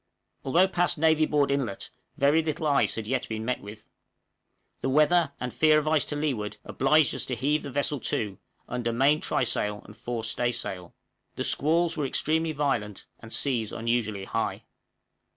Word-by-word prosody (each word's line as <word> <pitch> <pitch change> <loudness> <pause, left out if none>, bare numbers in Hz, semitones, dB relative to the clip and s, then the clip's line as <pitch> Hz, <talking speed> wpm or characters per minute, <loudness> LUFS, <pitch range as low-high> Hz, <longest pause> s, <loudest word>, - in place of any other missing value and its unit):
Although 170 +8 +4
past 175 -1 +1
Navy 160 0 +3
Board 145 -2 +2
Inlet, 130 -8 -2 0.3
very 145 +4 +4
little 160 0 -3
ice 140 -2 +2
had 110 - -4
yet 130 +3 -2
been 110 0 -4
met 125 +1 -1
with. 105 +1 -11 0.9
The - - -2
weather, 155 +3 +3
and 125 -1 -4
fear 155 -1 +4
of 155 0 0
ice 155 -1 +3
to 150 - -3
leeward, 130 -9 -2
obliged 150 +2 +3
us - - -1
to 125 - -2
heave 145 +6 0
the 140 - -7
vessel 145 +1 -1
to, 105 -4 -2 0.3
under 120 -1 -2
main 140 +6 +3
trysail 105 -4 -1
and 105 - -13
fore 120 0 -4
staysail. 110 -6 -3 0.4
The - - -2
squalls 165 +3 +2
were 145 -3 0
extremely 160 +4 +1
violent 120 -9 -2
and 110 - -12
seas 120 -6 0
unusually 115 -4 -1
high. 115 +3 -2
135 Hz, 170 wpm, -27 LUFS, 115-155 Hz, 0.9 s, Although